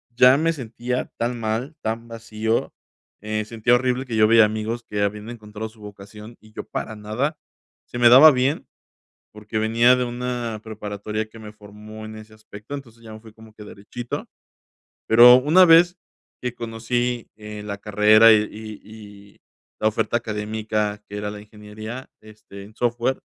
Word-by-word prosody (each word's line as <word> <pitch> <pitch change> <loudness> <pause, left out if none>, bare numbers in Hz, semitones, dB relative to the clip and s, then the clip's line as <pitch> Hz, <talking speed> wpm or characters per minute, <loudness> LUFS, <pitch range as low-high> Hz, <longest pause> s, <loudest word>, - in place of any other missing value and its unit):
ya 125 +2 +6
me 165 +2 +1
sentía 125 -1 -5
tan 120 +1 -2
mal, 115 +7 -3
tan 115 +1 -4
vacío. 115 -1 -3 0.5
Eh, 110 0 -3
sentía 115 +2 +1
horrible 125 +1 -1
que 120 -3 -5
yo 110 0 +5
veía 115 -1 +7
amigos 110 +2 -4
que 105 -1 -2
habían 105 +2 -2
encontrado 110 -2 -8
su 110 -1 -19
vocación, 105 +2 -12
y 110 0 -20
yo - - -6
para 110 - -6
nada, 110 +9 -3 0.5
se - - -8
me 120 - +6
daba 135 +6 +9
bien 135 +3 0 0.7
porque 105 +1 -6
venía 115 +3 +4
de 125 - -1
una 120 -2 -4
preparatoria 105 0 -5
que 115 +1 -15
me 105 -1 -10
formó 105 +1 -12
en 110 0 -9
ese 110 0 -13
aspecto. 110 +3 -12
Entonces, 115 -5 -12
ya 110 - -11
me 110 - -10
fui 110 -1 -16
como 110 0 -16
que 105 - -11
derechito. 115 +5 -7 0.8
Pero, 120 +2 +9
una 155 +8 +5
vez 175 +1 +6 0.5
que 125 -1 -3
conocí, 120 +1 -3
eh, 105 -1 -9
la 100 -1 -6
carrera 105 +2 +5
y 105 -1 +4 0.4
y 105 -2 -14 0.4
la 110 - +3
oferta 110 +2 -1
académica, 105 -1 -3
que 105 - -8
era 105 0 -4
la 105 - -9
ingeniería, 110 +4 -10
este, 105 -2 -14
en 105 +2 -16
software, 120 +2 -1
110 Hz, 165 wpm, -22 LUFS, 105-120 Hz, 0.8 s, daba